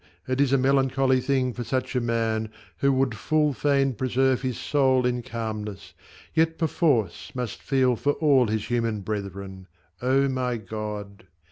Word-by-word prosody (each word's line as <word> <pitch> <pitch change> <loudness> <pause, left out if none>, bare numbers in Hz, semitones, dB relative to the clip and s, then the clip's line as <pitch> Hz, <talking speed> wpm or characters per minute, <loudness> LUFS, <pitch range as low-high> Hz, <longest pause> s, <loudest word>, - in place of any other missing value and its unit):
it 130 +1 0
is 140 -2 +2
a 135 - +5
melancholy 135 0 +2
thing 130 -2 0
For 120 - -5
such 130 +1 -2
a 125 - +2
man, 115 -2 -1 0.3
who 140 - +3
would 130 -2 +1
full 150 +6 +1
fain 140 -1 +2
preserve 130 +1 +1
His 130 -3 -2
soul 130 -3 +2
in 125 0 0
calmness, 110 -3 -6 0.4
yet 160 0 +2
perforce 145 - 0
must 125 -4 -4
feel 130 -2 +2
For 145 +5 0
all 140 -6 +3
his 110 0 -1
human 115 -3 0
brethren 100 -2 -6 0.3
O 135 +2 +3
my 125 -2 -1
God 105 -1 -7
125 Hz, 155 wpm, -25 LUFS, 110-135 Hz, 0.4 s, a